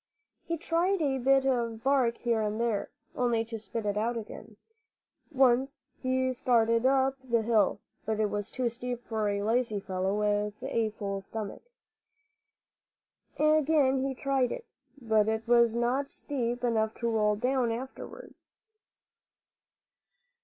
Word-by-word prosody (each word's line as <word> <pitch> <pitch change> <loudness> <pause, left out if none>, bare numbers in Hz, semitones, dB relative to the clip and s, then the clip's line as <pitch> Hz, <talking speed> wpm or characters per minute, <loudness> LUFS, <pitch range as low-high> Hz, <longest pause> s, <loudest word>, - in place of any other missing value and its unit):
He 335 0 -1
tried 340 +4 +1
a 275 -4 0
bit 270 +1 +3
of 235 -4 0
bark 260 -3 +2
here 230 -2 0
and 215 +1 -2
there, 230 -3 -1 0.3
only 235 -2 +1
to 225 0 -6
spit 220 +1 -5
it 205 0 -1
out 230 +3 0
again. 215 -1 -9 0.7
Once 270 0 +2
he 260 0 +1
started 230 -1 +2
up 270 0 +2
the 235 -3 +1
hill; 220 -3 +2 0.2
but 220 0 -2
it 215 -1 +1
was 205 -1 -3
too 255 -1 -1
steep 245 +1 -4
for 220 -2 -1
a 200 0 -1
lazy 225 -1 +1
fellow 190 +1 -2
with 210 0 0
a 225 -1 0
full 200 -2 -4
stomach. 205 +1 -6 1.8
Again 300 -3 +3
he 270 -1 -2
tried 270 -1 0
it; - - -5 0.3
but 220 -3 +2
it 220 +1 -1
was 235 -1 +4
not 250 +4 0
steep 245 -4 -3
enough 220 -2 +1
to 235 - -3
roll 210 -2 +2
down 250 +1 0
afterwards. 265 - -8
235 Hz, 140 wpm, -29 LUFS, 220-265 Hz, 1.8 s, was